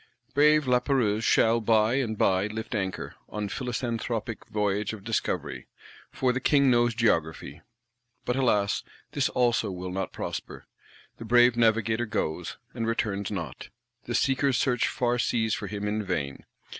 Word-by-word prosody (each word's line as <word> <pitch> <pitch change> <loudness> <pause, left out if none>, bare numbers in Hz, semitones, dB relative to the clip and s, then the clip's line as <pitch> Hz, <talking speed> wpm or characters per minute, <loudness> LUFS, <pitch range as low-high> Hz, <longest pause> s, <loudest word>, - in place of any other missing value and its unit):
Brave 150 +1 +5
Lapérouse 125 -4 +2
shall 115 +1 +3
by 110 +1 +3
and 120 -5 -1
by 95 +1 +2
lift 110 +3 -6
anchor, 95 -4 -3 0.2
on 105 -1 -4
philanthropic 120 -3 -3
Voyage 105 -1 -1
of 105 -3 -9
Discovery; 115 +1 -2 0.4
for 130 -1 +1
the 130 - -1
King 140 0 +4
knows 120 -1 +3
Geography. 80 - 0 0.6
But, 125 - 0
alas, 105 -6 +2 0.3
this 140 -2 +1
also 120 -3 +1
will 90 -1 -5
not 95 0 -3
prosper: - - -6 0.5
the 115 - -8
brave 120 +1 +5
Navigator 115 0 +2
goes, 90 -4 -3 0.2
and 115 -2 -3
returns 100 -3 -1
not; 85 -10 -6 0.4
the - - -3
Seekers 135 -1 +2
search 125 -3 +1
far 120 -1 0
seas 110 -2 +1
for - - -3
him 105 -1 -4
in 105 +1 -1
vain. 75 -8 -3
115 Hz, 145 wpm, -27 LUFS, 100-125 Hz, 0.6 s, Brave